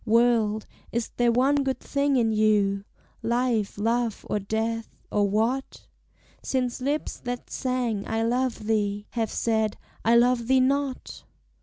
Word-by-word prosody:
World, 225 Hz, -2 st, +3 dB, 0.3 s
is 235 Hz, -1 st, -2 dB
there 240 Hz, -1 st, +4 dB
one 265 Hz, +4 st, +3 dB
good 265 Hz, -2 st, 0 dB
thing 280 Hz, 0 st, 0 dB
in 230 Hz, -3 st, +3 dB
you, 205 Hz, -2 st, +2 dB, 0.4 s
Life, 235 Hz, -3 st, 0 dB
love, 230 Hz, +1 st, 0 dB
or 210 Hz, -, 0 dB
death 220 Hz, +3 st, -3 dB
or 205 Hz, -1 st, +2 dB
what? 230 Hz, +6 st, -1 dB, 0.6 s
Since 255 Hz, -1 st, -1 dB
lips 285 Hz, +4 st, -2 dB
that 245 Hz, 0 st, -5 dB
sang, 245 Hz, -5 st, -1 dB
I 225 Hz, 0 st, 0 dB
love 245 Hz, -1 st, 0 dB
thee, 205 Hz, -2 st, 0 dB
Have 225 Hz, -2 st, -1 dB
said, 220 Hz, -2 st, 0 dB, 0.3 s
I 230 Hz, +1 st, +4 dB
love 240 Hz, 0 st, +3 dB
thee 260 Hz, 0 st, +4 dB
not? 275 Hz, 0 st, -1 dB
230 Hz, 140 wpm, -26 LUFS, 215-255 Hz, 0.6 s, there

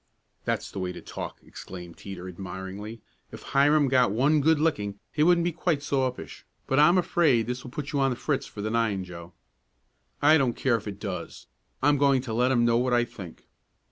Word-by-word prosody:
"That's -, -, -2 dB
the -, -, -6 dB
way 90 Hz, -1 st, -2 dB
to -, -, -8 dB
talk!" -, -, -7 dB
exclaimed 90 Hz, -2 st, -10 dB
Teeter 95 Hz, -2 st, -8 dB
admiringly. 95 Hz, +4 st, -7 dB, 0.3 s
"If -, -, -10 dB
Hiram 145 Hz, +1 st, +3 dB
got 130 Hz, -4 st, +3 dB
one 140 Hz, +7 st, +3 dB
good 160 Hz, +1 st, +3 dB
licking 105 Hz, -11 st, -1 dB
he 150 Hz, -, -2 dB
wouldn't 170 Hz, +1 st, +4 dB
be 175 Hz, -, +1 dB
quite 160 Hz, -3 st, -1 dB
so 135 Hz, -2 st, +1 dB
uppish. 125 Hz, -, -11 dB, 0.2 s
But 135 Hz, -, +1 dB
I'm 170 Hz, +5 st, +6 dB
afraid 155 Hz, -10 st, +3 dB
this 125 Hz, +1 st, -4 dB
will 125 Hz, -, -8 dB
put 145 Hz, +2 st, -6 dB
you 145 Hz, -, 0 dB
on 135 Hz, 0 st, +3 dB
the 125 Hz, -, -2 dB
fritz 140 Hz, +3 st, -2 dB
for 105 Hz, -, -8 dB
the 110 Hz, -, -2 dB
nine, 110 Hz, -5 st, 0 dB
Joe." 85 Hz, -1 st, -10 dB, 0.9 s
"I 155 Hz, +2 st, +5 dB
don't 125 Hz, -4 st, +1 dB
care 130 Hz, -3 st, +1 dB
if 110 Hz, -, -9 dB
it 100 Hz, -1 st, -6 dB
does. 100 Hz, -3 st, -6 dB, 0.4 s
I'm 145 Hz, 0 st, +4 dB
going 140 Hz, -2 st, +3 dB
to 115 Hz, -4 st, -5 dB
let 125 Hz, +3 st, +2 dB
'em 120 Hz, -2 st, +3 dB
know 115 Hz, 0 st, +3 dB
what 125 Hz, +1 st, +1 dB
I 120 Hz, 0 st, +3 dB
think." 90 Hz, -7 st, -11 dB
125 Hz, 210 wpm, -27 LUFS, 100-145 Hz, 0.9 s, I'm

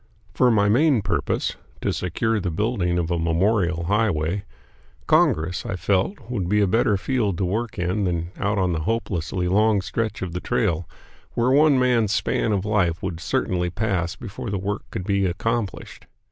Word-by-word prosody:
For 125 Hz, -, +4 dB
my 105 Hz, -3 st, +3 dB
main 130 Hz, +1 st, +3 dB
purpose -, -, -1 dB, 0.2 s
to -, -, 0 dB
secure 110 Hz, +5 st, -1 dB
the 90 Hz, -2 st, -2 dB
building 90 Hz, -1 st, 0 dB
of 85 Hz, 0 st, -1 dB
a 85 Hz, -, 0 dB
memorial 85 Hz, +1 st, +1 dB
highway 100 Hz, -1 st, 0 dB, 0.6 s
Congress, 80 Hz, +8 st, +2 dB
I 95 Hz, -, -3 dB
felt, 95 Hz, -, 0 dB
would 100 Hz, -8 st, -2 dB
be 105 Hz, +1 st, +3 dB
a 105 Hz, -, +4 dB
better 105 Hz, +1 st, +2 dB
field 105 Hz, -4 st, -1 dB
to 95 Hz, -, 0 dB
work 110 Hz, +5 st, -2 dB
in 90 Hz, +3 st, 0 dB
than 85 Hz, -1 st, -2 dB
out 100 Hz, +1 st, 0 dB
on 90 Hz, -2 st, +1 dB
the 80 Hz, -, -1 dB
hopelessly 90 Hz, -2 st, -2 dB
long 105 Hz, +3 st, +3 dB
stretch 110 Hz, +1 st, -3 dB
of 90 Hz, -2 st, -5 dB
the 90 Hz, -, -2 dB
trail, 90 Hz, -9 st, 0 dB, 0.5 s
where 120 Hz, +2 st, +2 dB
one 145 Hz, 0 st, +5 dB
man's 120 Hz, -5 st, +2 dB
span 110 Hz, -, 0 dB
of 100 Hz, -1 st, 0 dB
life 90 Hz, -6 st, +1 dB
would 90 Hz, -4 st, -3 dB
certainly 90 Hz, +1 st, -1 dB
pass 90 Hz, -3 st, -1 dB
before 120 Hz, +1 st, -7 dB
the 100 Hz, -, -1 dB
work 100 Hz, +2 st, -3 dB
could 95 Hz, -, -5 dB
be 100 Hz, 0 st, +1 dB
accomplished. 115 Hz, +3 st, -3 dB
100 Hz, 175 wpm, -23 LUFS, 90-110 Hz, 0.6 s, one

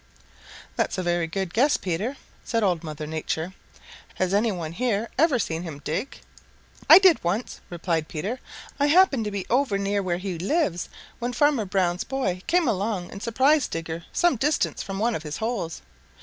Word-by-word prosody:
"That's -, -, 0 dB
a 185 Hz, -, -1 dB
very 175 Hz, -1 st, 0 dB
good 185 Hz, +1 st, -3 dB
guess, 280 Hz, +6 st, +3 dB
Peter," 200 Hz, +10 st, -3 dB, 0.3 s
said 230 Hz, -1 st, 0 dB
Old 180 Hz, -5 st, +1 dB
Mother 155 Hz, -1 st, -6 dB
Nature. 160 Hz, +3 st, -3 dB, 0.6 s
"Has 185 Hz, 0 st, 0 dB
any 215 Hz, +3 st, +3 dB
one 170 Hz, -5 st, -4 dB
here 230 Hz, +2 st, -1 dB
ever 295 Hz, -2 st, +3 dB
seen 165 Hz, -7 st, -2 dB
him 165 Hz, -5 st, -6 dB
dig?" 195 Hz, -, -3 dB, 0.7 s
"I -, -, +12 dB
did 375 Hz, -3 st, +5 dB
once," 195 Hz, +8 st, -2 dB
replied 165 Hz, -2 st, -1 dB
Peter. 200 Hz, +11 st, -4 dB, 0.4 s
"I 285 Hz, -, +3 dB
happened 295 Hz, -, +4 dB
to -, -, -1 dB
be 200 Hz, -2 st, -3 dB
over 250 Hz, -5 st, +2 dB
near 200 Hz, +1 st, 0 dB
where 180 Hz, -2 st, -1 dB
he 180 Hz, -2 st, -4 dB
lives 195 Hz, -, 0 dB, 0.3 s
when 240 Hz, +1 st, -2 dB
Farmer 290 Hz, -5 st, +2 dB
Brown's 185 Hz, -2 st, 0 dB
boy 235 Hz, -9 st, -2 dB
came 345 Hz, -2 st, +3 dB
along 200 Hz, -3 st, -1 dB
and 195 Hz, -, -8 dB
surprised 265 Hz, +6 st, +3 dB
Digger 165 Hz, 0 st, -5 dB
some 350 Hz, -7 st, +2 dB
distance 295 Hz, +6 st, 0 dB
from 195 Hz, -1 st, -5 dB
one 230 Hz, +4 st, +1 dB
of 160 Hz, -, -3 dB
his 150 Hz, -1 st, -5 dB
holes. 220 Hz, -8 st, -3 dB
200 Hz, 180 wpm, -25 LUFS, 175-250 Hz, 0.7 s, I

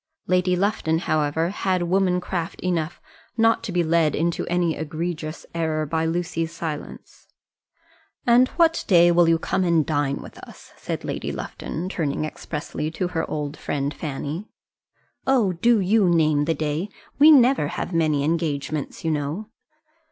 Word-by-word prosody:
Lady 180 Hz, 0 st, +2 dB
Lufton, 180 Hz, -4 st, 0 dB
however, 155 Hz, 0 st, 0 dB
had 185 Hz, -3 st, 0 dB
woman 180 Hz, 0 st, +2 dB
craft 175 Hz, -2 st, -4 dB
enough 175 Hz, -3 st, -2 dB, 0.4 s
not 225 Hz, 0 st, +3 dB
to 200 Hz, -, -4 dB
be 175 Hz, -1 st, +1 dB
led 160 Hz, -2 st, +2 dB
into 170 Hz, +2 st, -1 dB
any 175 Hz, -2 st, +1 dB
egregious 155 Hz, 0 st, -4 dB
error 160 Hz, -2 st, -1 dB
by 160 Hz, +2 st, -1 dB
Lucy's 165 Hz, -1 st, -2 dB
silence. 160 Hz, -3 st, -7 dB, 1.0 s
"And 245 Hz, +1 st, +5 dB
what 330 Hz, -1 st, +3 dB
day 175 Hz, -3 st, +6 dB
will 170 Hz, -1 st, +4 dB
you 165 Hz, -, +4 dB
come 190 Hz, +3 st, -1 dB
and 170 Hz, -4 st, +2 dB
dine 145 Hz, -3 st, 0 dB
with -, -, -11 dB
us?" -, -, -14 dB
said -, -, -5 dB
Lady -, -, -3 dB
Lufton, 170 Hz, +3 st, -5 dB
turning 155 Hz, -5 st, -2 dB
expressly 155 Hz, 0 st, -5 dB
to 175 Hz, +3 st, -3 dB
her 165 Hz, -2 st, -2 dB
old 150 Hz, -1 st, -3 dB
friend 145 Hz, -1 st, -3 dB
Fanny. 150 Hz, +5 st, -5 dB, 0.8 s
"Oh, 240 Hz, -8 st, +3 dB
do 230 Hz, +6 st, +3 dB
you 200 Hz, 0 st, +3 dB
name 155 Hz, -3 st, +3 dB
the 165 Hz, +1 st, 0 dB
day. 155 Hz, +5 st, -2 dB, 0.3 s
We 300 Hz, +2 st, +8 dB
never 265 Hz, -, +5 dB
have 175 Hz, -, -4 dB
many 155 Hz, -4 st, +2 dB
engagements, 155 Hz, -2 st, -2 dB
you 160 Hz, -, +2 dB
know." 155 Hz, +9 st, -3 dB
165 Hz, 150 wpm, -23 LUFS, 155-185 Hz, 1.0 s, We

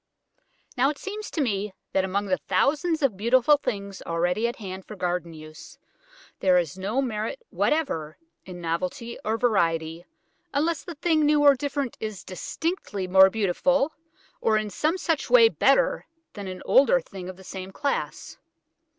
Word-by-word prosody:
Now 255 Hz, +2 st, +3 dB
it 295 Hz, -, -4 dB
seems 420 Hz, +2 st, -6 dB
to 320 Hz, -, -2 dB
me, 205 Hz, -5 st, -1 dB, 0.2 s
that 190 Hz, -, +2 dB
among 195 Hz, +2 st, -1 dB
the 185 Hz, -2 st, 0 dB
thousands 315 Hz, +2 st, +1 dB
of 255 Hz, -7 st, +2 dB
beautiful 250 Hz, +7 st, +4 dB
things 200 Hz, -7 st, -5 dB
already 175 Hz, +7 st, 0 dB
at 235 Hz, -, -4 dB
hand 190 Hz, -3 st, -7 dB
for 215 Hz, -, -10 dB
garden 180 Hz, -2 st, -2 dB
use, 155 Hz, -1 st, -12 dB, 0.6 s
there 185 Hz, -2 st, +4 dB
is 170 Hz, -3 st, 0 dB
no 205 Hz, +8 st, -1 dB
merit 225 Hz, -, -4 dB
whatever 165 Hz, -, -1 dB, 0.3 s
in 180 Hz, -2 st, -9 dB
novelty 180 Hz, +9 st, -3 dB
or 220 Hz, +1 st, 0 dB
variety 170 Hz, -7 st, 0 dB, 0.5 s
unless 320 Hz, +3 st, +1 dB
the 345 Hz, -, -8 dB
thing 315 Hz, 0 st, +2 dB
new 295 Hz, 0 st, +4 dB
or 285 Hz, -1 st, +8 dB
different 280 Hz, -1 st, -3 dB
is 215 Hz, -4 st, -5 dB
distinctly 205 Hz, -, -4 dB
more 190 Hz, +1 st, +7 dB
beautiful, 265 Hz, -, +1 dB, 0.5 s
or 220 Hz, -1 st, +3 dB
in 215 Hz, -1 st, -2 dB
some 315 Hz, -, 0 dB
such 325 Hz, -6 st, -1 dB
way 470 Hz, -2 st, +7 dB
better -, -, +2 dB, 0.3 s
than 200 Hz, -2 st, -7 dB
an 185 Hz, 0 st, -7 dB
older 280 Hz, -, +5 dB
thing 190 Hz, -, -9 dB
of 185 Hz, -, -9 dB
the 190 Hz, -, -14 dB
same 185 Hz, +1 st, -7 dB
class. 285 Hz, +6 st, -3 dB
215 Hz, 160 wpm, -25 LUFS, 185-290 Hz, 0.6 s, or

